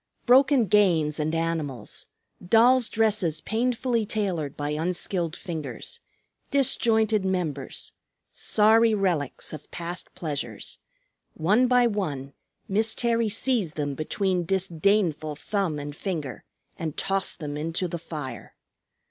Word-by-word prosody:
Broken 265 0 +5
games 170 -7 +3
and 155 +2 0
animals, 165 -6 -3 0.4
dolls' 235 +6 +5
dresses 210 -8 +2
painfully 235 +3 0
tailored 190 -9 -2
by 145 0 -2
unskilled 170 +1 -1
fingers, 160 -6 -6 0.5
disjointed 225 -6 +2
members, 170 -8 -2 0.4
sorry 220 +1 +4
relics 175 -11 0
of 155 -1 -9
past 175 0 -5
pleasures, 140 - -4 0.6
one 210 +10 +3
by 250 -1 +4
one 150 - -2 0.3
Miss 220 +3 +2
Terry 230 -2 +1
seized 225 -6 0
them 145 -2 -2
between 180 +5 -1
disdainful 175 -3 +1
thumb 185 -1 -2
and 145 0 -6
finger 155 -8 -4 0.3
and 160 -3 -4
tossed 195 -1 0
them 145 -2 -5
into 165 +4 -1
the 170 0 -5
fire. 150 -5 -7
180 Hz, 115 wpm, -26 LUFS, 155-220 Hz, 0.6 s, Broken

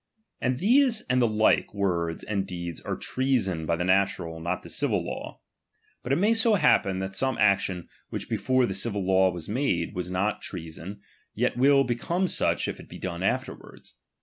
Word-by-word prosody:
And 125 0 0
these 240 - +4
and 125 0 +3
the 120 - +4
like 110 -1 +2
words 85 -4 -1
and 100 -2 -2
deeds 85 -2 -6
are - - -3
treason 110 -12 -1
by 85 - +2
the 85 - -2
natural, 95 -3 +1
not 85 +3 -3
the - - -10
civil - - 0
law. - - -7 0.6
But 125 - -5
it - - +4
may 205 +7 +3
so 225 -1 +4
happen, 150 - +3
that 95 0 -4
some 130 +5 -1
action, 100 -3 +1 0.2
which - - -5
before 130 -1 +1
the 95 - -3
civil 100 0 -2
law 95 0 +4
was 85 -3 -7
madej 105 -8 -1
was 90 0 -4
not 95 +4 -1
treason, 90 +3 -7 0.3
yet - - 0
will 135 +2 +5
become 170 +10 -1
such - - +1
if - - -5
it - - -13
be - - -9
done 85 -1 -5
afterwards. 95 - -4
100 Hz, 185 wpm, -26 LUFS, 90-130 Hz, 0.6 s, will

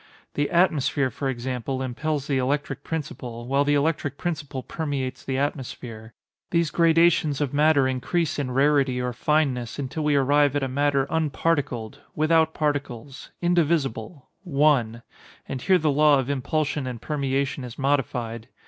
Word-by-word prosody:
The 145 0 0
atmosphere, 150 -6 +2
for 135 - -3
example, 130 +1 -3
impels 140 +3 -2
the 140 -2 0
electric 140 +3 -2
principle, 125 -7 -5
while 140 +2 +2
the 145 0 +2
electric 145 -1 0
principle 150 -6 -4
permeates 140 -5 -4
the 130 -1 -2
atmosphere. 120 -5 -4 0.3
These 170 -2 +1
gradations 165 -3 +3
of 145 -3 -1
matter 145 -2 +4
increase 145 +6 -1
in 140 -3 -2
rarity 135 -1 +2
or 125 0 -2
fineness, 130 -3 0
until 140 +3 -3
we 150 -1 +2
arrive 145 +1 +3
at 145 - 0
a - - 0
matter 140 +1 +1
unparticled—without 155 +1 0
particles—indivisible—one; 145 - -1 0.4
and 130 - -5
here 190 -1 +4
the 155 -3 +1
law 150 0 +5
of 135 +1 -1
impulsion 145 +1 -1
and 125 -2 -5
permeation 140 -1 -2
is 125 -2 -8
modified. 125 -5 -1
140 Hz, 135 wpm, -24 LUFS, 130-155 Hz, 0.4 s, law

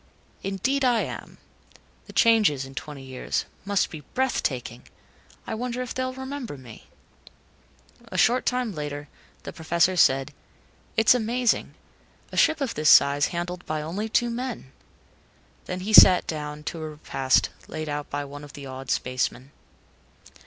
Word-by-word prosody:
"Indeed, 235 +9 -1
I 245 -3 +3
am. - - -7 0.7
The - - -12
changes, 210 - +4
in 135 - -11
twenty 145 -1 -7
years 130 -1 -3 0.2
must 200 -2 +1
be 160 - -7 0.2
breathtaking. 130 - -1 0.6
I - - -4
wonder 245 +2 -3
if 250 - -6
they'll 255 0 -2
remember 265 - -6
me?" 125 -4 -13 1.2
A - - -6
short 245 +2 +3
time 250 -4 0
later, 145 -2 -5 0.3
the - - -7
Professor 170 +3 +1
said, 135 -3 +3 0.6
"It's 225 +1 +6
amazing. 245 0 0 0.6
A - - -8
ship 315 -1 +4
of 265 -4 -1
this 155 0 +2
size 140 +1 +6
handled 175 0 -4
by 155 -1 -2
only 200 +8 -4
two 240 +2 +1
men." 240 - -5 0.9
Then 185 0 -4
he 210 +3 -3
sat 185 -3 +9
down 150 -1 -5
to 160 +1 -5
a 155 - -4
repast 135 -3 +1 0.2
laid 155 0 -5
out 145 0 -4
by 145 0 -3
one 145 +1 -9
of 145 - -12
the 140 -1 -9
awed 130 0 -8
spacemen. 130 +1 -1
165 Hz, 150 wpm, -25 LUFS, 145-230 Hz, 1.2 s, sat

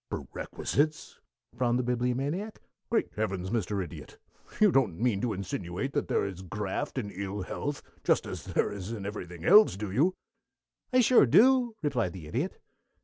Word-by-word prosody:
"Perquisites?" 150 +1 -2 0.4
frowned 120 -1 +1
the 125 - 0
Bibliomaniac. 130 - -1 0.3
"Great 230 - +1
Heavens, 95 -3 -2
Mr. 105 -3 -1
Idiot, 85 - -10 0.4
you 210 -2 +6
don't 115 - +2
mean 115 -4 +1
to 120 - 0
insinuate 95 +5 -4
that 145 - -1
there - - +1
is 95 -2 -6
graft 105 - -4
in 105 -5 -3
ill 100 +1 -4
health, 145 +9 -4 0.2
just - - +2
as - - -6
there - - 0
is 100 0 -6
in 105 -4 -5
everything 90 -5 -6
else, 205 - +7
do 100 -1 -4
you?" 165 - +2 0.8
"I 255 0 +5
sure 240 - +6
do," 245 - +5
replied 125 - 0
the 90 -5 -9
Idiot. 75 - -3
115 Hz, 160 wpm, -29 LUFS, 95-145 Hz, 0.8 s, else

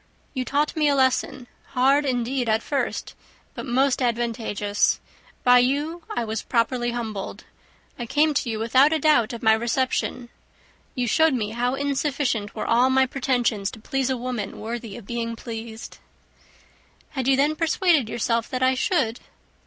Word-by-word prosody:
You 260 -2 -2
taught 290 +3 0
me 305 -2 +2
a 285 - +3
lesson, 260 -1 +1 0.3
hard 275 +3 +3
indeed 250 -1 -1
at 220 +1 +1
first, 280 -2 -2 0.4
but - - -7
most 265 +2 +2
advantageous. 225 -4 0 0.4
By 250 0 +7
you, 290 +7 0
I 240 -1 -2
was 220 0 -3
properly 240 0 0
humbled. 220 -5 -5 0.6
I 240 - -4
came 295 +4 +2
to 275 -3 -1
you 220 - -2
without 255 +6 +4
a 320 - +2
doubt 300 -7 +3
of 235 -1 -7
my 220 -1 +6
reception. 240 +1 -1 0.7
You 250 -2 0
showed 320 +4 +3
me 215 -3 -2
how 245 +3 0
insufficient 275 -6 -1
were - - -3
all 245 +3 +3
my 265 0 +4
pretensions 245 -6 0
to - - -11
please 270 +3 -1
a 260 - 0
woman 240 -5 -4
worthy 225 -1 -6
of 235 - -11
being 230 +1 -3
pleased." 225 -1 -8 1.1
"Had 265 -4 -3
you 270 - +5
then 295 +3 +2
persuaded 325 - +2
yourself 230 0 -1
that 255 0 -2
I 260 0 +4
should?" 255 -4 0
250 Hz, 160 wpm, -24 LUFS, 230-275 Hz, 1.1 s, By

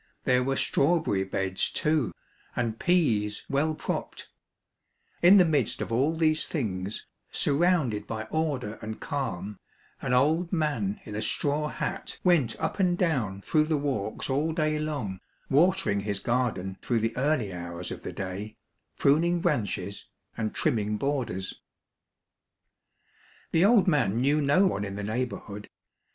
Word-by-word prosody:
There 125 0 +3
were 135 +1 0
strawberry 140 - +2
beds 95 0 -1
too, 150 -5 +1 0.4
and 115 -2 -1
peas 115 -13 +1
well 155 +3 +1
propped; - - -4 0.9
in 185 +4 +8
the 180 - +7
midst 145 -8 +1
of - - -4
all 135 +8 +2
these 155 -1 +2
things, 100 - -3 0.3
sur 145 - 0
rounded 150 - +2
by 110 -1 -3
order 140 -9 -1
and 110 0 -6
calm, 105 - -4 0.4
an - - -2
old 155 +7 +3
man 145 - 0
in 105 - -8
a 105 - -2
straw 150 +5 0
hat - - -4
went 160 -11 +3
up - - -2
and 180 -2 +3
down 125 - 0
through 155 +8 +2
the 155 -1 +1
walks 130 -8 -2
all 145 +4 0
day 155 -2 0
long, 140 -12 -3 0.3
watering 170 - +3
his 100 0 -1
garden 110 -5 -1
through 115 -3 0
the 115 +1 -1
early 125 -7 0
hours 85 0 -5
of - - -6
the - - -5
day, 100 +3 -5 0.4
pruning 170 +5 +3
branches, 100 - -2 0.3
and 110 -1 -3
trimming 105 -1 0
borders. 120 -9 -2 1.9
The 165 - +4
old 215 -2 +5
man 145 - +2
knew 145 +4 +3
no 145 +7 +4
one 105 - 0
in 100 -1 -5
the 105 - -4
neighborhood. 110 -2 -4
130 Hz, 145 wpm, -27 LUFS, 105-155 Hz, 1.9 s, in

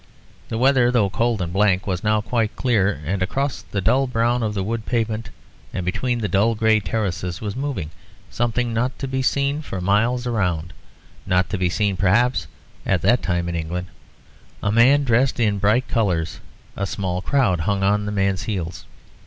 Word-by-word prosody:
The 110 - -2
weather, 125 0 +4
though 110 -6 +2
cold 115 -2 0
and 85 0 -5
blank, 95 -1 +2
was 90 -3 -2
now 105 0 +2
quite 115 0 -1
clear, 105 - +1
and 95 +4 -2
across 135 +8 -1
the 100 - -4
dull 130 +7 +2
brown 120 0 +1
of 105 -2 -1
the 95 - -1
wood 110 +2 -3
pavement 115 -3 -1 0.5
and 90 - -2
between 115 +6 -1
the 105 - 0
dull 100 +5 +2
grey 110 0 +3
terraces 95 -5 -3
was 105 -1 -4
moving 125 - -3 0.4
something 120 0 -1
not 125 +3 -1
to 135 - -4
be 130 0 -1
seen 140 +3 0
for 95 -10 -5
miles 115 +7 +1
round 90 -8 -1 0.5
not 90 0 +1
to 105 - -1
be 90 -1 +1
seen 100 0 0
perhaps 115 +7 +2 0.4
at 90 -4 0
that 120 +6 +4
time 85 -1 -1
in 85 - -3
England 85 +2 -4 0.7
a 105 - +1
man 130 +6 +5
dressed 125 0 +2
in 105 -3 +1
bright 110 +6 +2
colours. 90 -8 0 0.4
A 100 - -2
small 90 -2 -2
crowd 125 - +2
hung 95 +4 0
on 105 +1 +2
the - - -2
man's 100 0 0
heels. 90 -5 -4
105 Hz, 185 wpm, -22 LUFS, 95-120 Hz, 0.7 s, man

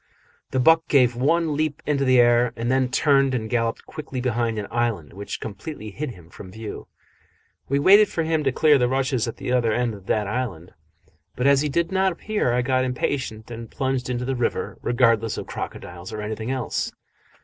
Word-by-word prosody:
The 130 - -1
buck 160 +5 +4
gave 125 -4 +4
one 155 +4 +1
leap 155 0 -2
into 140 -2 +1
the 130 -1 +5
air, 120 0 +4
and 120 +1 -2
then 130 -1 +2
turned 135 0 +3
and 110 -3 -2
galloped 115 0 -1
quickly 140 -4 -6
behind 120 -2 -1
an 105 - -3
island 115 - -1
which 100 +2 -6
completely 110 0 -7
hid 150 +8 -4
him 90 -7 -13
from 95 - -11
view. 110 +1 -8 0.8
We 140 - +2
waited 200 +8 +6
for 165 - -1
him 160 -1 0
to 135 - +3
clear 150 +1 +4
the 125 - +3
rushes 130 -2 0
at 115 - -5
the 135 -2 -4
other 120 -3 +2
end 120 +1 0
of 100 -2 -12
this 105 -1 +1
island, 100 -6 -4 0.6
but 125 - -2
as 140 -1 +5
he 150 - 0
did 170 +6 0
not 190 0 +2
appear 205 - -1
I 125 +1 +1
got 130 0 +1
impatient 125 -3 -3
and 115 0 -7
plunged 130 -2 -2
into 125 0 -2
the 135 +1 -1
river, 120 -1 -2
regardless 115 -2 +2
of - - -5
crocodiles 90 +1 -7
or 110 - -5
anything 110 +2 -4
else. 130 -3 -2
125 Hz, 200 wpm, -23 LUFS, 115-140 Hz, 0.8 s, waited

